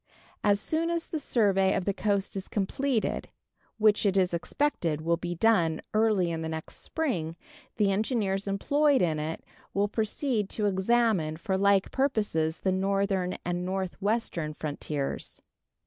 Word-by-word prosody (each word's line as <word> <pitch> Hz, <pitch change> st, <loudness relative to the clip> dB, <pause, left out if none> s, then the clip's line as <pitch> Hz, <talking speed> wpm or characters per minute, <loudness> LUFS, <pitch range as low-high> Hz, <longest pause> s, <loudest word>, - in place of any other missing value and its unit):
As 205 Hz, -1 st, +4 dB
soon 325 Hz, +8 st, -1 dB
as 335 Hz, -1 st, -1 dB
the 315 Hz, -, -4 dB
survey 200 Hz, -8 st, +2 dB
of 180 Hz, -, -1 dB
the 200 Hz, -, +1 dB
coast 200 Hz, -1 st, -1 dB
is 195 Hz, -1 st, -4 dB
completed, 225 Hz, +4 st, -1 dB, 0.5 s
which 215 Hz, -1 st, +4 dB
it 195 Hz, -2 st, +2 dB
is 180 Hz, -2 st, +2 dB
expected 170 Hz, -, -1 dB
will 170 Hz, +1 st, +2 dB
be 175 Hz, +1 st, -4 dB
done 170 Hz, -6 st, +3 dB
early 215 Hz, -5 st, +3 dB
in 165 Hz, -1 st, -3 dB
the 160 Hz, -, -3 dB
next 160 Hz, 0 st, -6 dB
spring, 180 Hz, -, -2 dB, 0.4 s
the 205 Hz, -2 st, +3 dB
engineers 200 Hz, -2 st, 0 dB
employed 285 Hz, +7 st, +2 dB
in 155 Hz, -3 st, +1 dB
it 155 Hz, +2 st, -4 dB, 0.3 s
will 200 Hz, +1 st, +2 dB
proceed 220 Hz, 0 st, -1 dB
to 210 Hz, -, -1 dB
examine 195 Hz, -5 st, +2 dB
for 190 Hz, +3 st, -2 dB
like 200 Hz, 0 st, +3 dB
purposes 205 Hz, -, 0 dB
the 190 Hz, -, +1 dB
northern 195 Hz, -1 st, 0 dB
and 175 Hz, 0 st, -1 dB
northwestern 190 Hz, -3 st, -2 dB
frontiers. 150 Hz, -2 st, -4 dB
195 Hz, 145 wpm, -28 LUFS, 175-220 Hz, 0.5 s, As